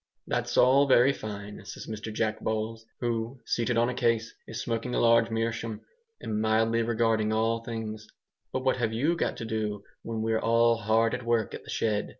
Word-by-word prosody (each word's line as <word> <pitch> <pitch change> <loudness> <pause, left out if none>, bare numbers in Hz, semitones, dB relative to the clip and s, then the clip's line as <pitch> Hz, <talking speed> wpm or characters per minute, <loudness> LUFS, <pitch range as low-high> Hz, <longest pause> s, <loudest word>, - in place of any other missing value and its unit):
"That's - - -2
all 135 +3 +6
very 130 +1 +5
fine," 105 -3 -7
says - - -8
Mr 110 0 -6
Jack 110 0 -1
Bowles, 110 +1 -3
who, 120 +1 -2
seated 120 0 0
on 120 +1 +4
a 125 - -1
case, 115 -2 0
is 115 - -6
smoking 115 +1 -2
a - - +2
large 115 0 +5
meerschaum 115 -1 -2 0.4
and 105 0 -2
mildly 110 +1 +2
regarding 115 -1 +1
all 115 +1 +1
things, 110 -2 -5 0.4
"but 130 - -2
what 130 -1 +2
have 115 -3 0
you 145 +10 +1
got - - -1
to 115 - -5
do 105 -2 -2 0.2
when 110 -1 -3
we're 110 0 +1
all 115 0 +4
HARD 115 +1 +2
AT 125 0 -3
WORK 115 -2 0
at - - -8
the - - -13
shed?" 105 -2 0
115 Hz, 190 wpm, -28 LUFS, 110-115 Hz, 0.4 s, all